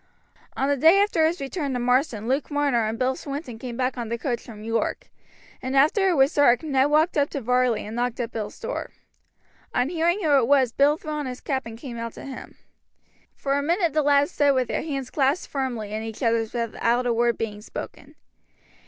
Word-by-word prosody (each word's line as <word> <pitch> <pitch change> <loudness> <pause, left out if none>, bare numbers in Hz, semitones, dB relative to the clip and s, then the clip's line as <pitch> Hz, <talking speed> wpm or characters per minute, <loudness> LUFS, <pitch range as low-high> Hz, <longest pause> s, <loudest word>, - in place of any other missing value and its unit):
On 270 - +1
the 285 - +2
day 320 +7 +6
after 400 -6 +3
his 340 +3 -2
return 280 0 -3
to 250 - -1
Marsden 245 -3 +1
Luke 270 +3 0
Marner 285 -6 +1
and 220 +1 -3
Bill 260 +1 +1
Swinton 275 -5 -6
came 240 -2 -6
back 255 0 -1
on 230 -2 -4
the 235 - -2
coach 240 -1 -2
from 215 -3 -11
York, 225 +1 -2 0.5
and 260 +1 -3
after 315 +8 +4
it 355 - +2
was 270 +2 +4
dark 280 -2 +4
Ned 275 -2 +2
walked 310 +2 +3
up 285 - +2
to 280 - -4
Varley 250 -1 +1
and 215 +2 -7
knocked 245 0 -2
at 240 -1 -3
Bill's 215 -2 -5
door. - - -4 0.9
On 250 +3 +2
hearing 345 +4 0
who 300 -3 +4
it 235 - +1
was 265 -3 +4
Bill 285 +4 +3
threw 310 - -7
on 300 -2 -3
his 250 -1 -6
cap 265 -4 -3
and 225 0 -8
came 235 -2 -7
out 230 0 -5
to - - -10
him. 270 -1 -9 0.8
For 275 - -2
a 285 - +1
minute 340 +1 +1
the 310 - +3
lads 285 +2 +3
stood 285 -4 +3
with 255 -2 0
their - - -1
hands 275 -5 -4
clasped 280 +4 0
firmly 240 -7 -3
in 215 - -2
each 225 +2 -6
other's 230 -1 +1
without 235 +1 0
a 240 - +2
word 235 0 +1
being 210 -2 -4
spoken. - - -9
265 Hz, 220 wpm, -24 LUFS, 235-290 Hz, 0.9 s, day